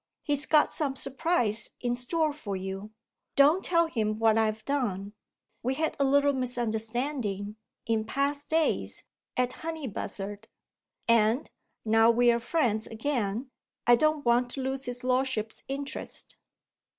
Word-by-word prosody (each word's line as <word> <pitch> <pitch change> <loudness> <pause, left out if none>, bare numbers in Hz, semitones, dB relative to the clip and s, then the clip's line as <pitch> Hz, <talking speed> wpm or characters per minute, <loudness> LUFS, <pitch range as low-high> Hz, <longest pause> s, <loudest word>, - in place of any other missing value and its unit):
He's 290 -1 0
got 305 -1 +4
some 280 -4 -1
surprise 265 -6 +1
in 245 -1 -1
store 300 +5 0
for 215 -10 -5
you. 190 +2 -5 0.5
Don't 300 +7 +5
tell 335 -1 +3
him 215 -9 -1
what 225 -1 +4
I've 220 -1 0
done! 205 -8 -1 0.5
We 260 +2 -1
had 315 +2 -1
a - - +4
little 285 +1 +4
misunderstanding, 235 -3 -2 0.3
in 220 -1 0
past 280 +4 -1
days, 320 0 0 0.3
at 250 0 +2
Honeybuzzard 215 -10 -5 0.6
and, 230 +4 +3 0.3
now 225 +1 +5
we 240 +1 +5
are 235 - +1
friends 235 -5 0
again, 230 0 -2 0.3
I 240 - +7
don't 310 +2 +1
want 240 +1 +3
to 270 - -3
lose 265 +1 -2
his 245 0 -5
lordship's 255 -4 0
interest." 280 +1 -4
245 Hz, 135 wpm, -28 LUFS, 220-285 Hz, 0.6 s, I